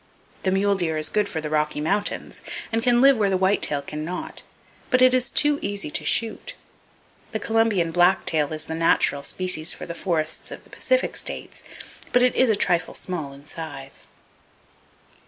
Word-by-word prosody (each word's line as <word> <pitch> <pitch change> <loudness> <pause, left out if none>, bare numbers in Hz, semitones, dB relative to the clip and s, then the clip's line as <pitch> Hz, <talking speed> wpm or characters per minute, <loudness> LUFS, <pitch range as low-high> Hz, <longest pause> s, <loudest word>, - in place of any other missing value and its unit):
The 190 - 0
mule 200 +2 +2
deer 170 -5 -1
is 155 - -1
good 210 -1 0
for 160 - -3
the 155 - -4
Rocky 150 -1 0
Mountains, 200 +7 -1 0.3
and 225 0 0
can 240 0 +3
live 275 -1 +6
where 205 -2 +2
the 190 - +1
white 190 +2 +2
tail 145 -1 0
can 150 +2 -6
not; 180 +3 -5 0.5
but 255 - +3
it 255 0 +6
is 255 -1 +2
too 295 +2 +3
easy 200 -6 -3
to 155 - 0
shoot! 230 - 0 0.8
The 220 - -1
Columbian 220 -7 +1
black 175 +3 +3
tail 150 -2 +1
is 155 -1 -4
the 160 - -5
natural 160 -3 +2
species 175 +1 0
for - - -8
the 170 - -6
forests 165 -3 -2
of - - -9
the - - -21
Pacific - - 0
states; - - -5 0.5
but 245 - +4
it 250 - +4
is 260 - +3
a 220 - +4
trifle 175 -4 0
small 160 -7 -4
in 140 +1 -14
size. 150 -4 -8
185 Hz, 190 wpm, -23 LUFS, 155-225 Hz, 0.8 s, live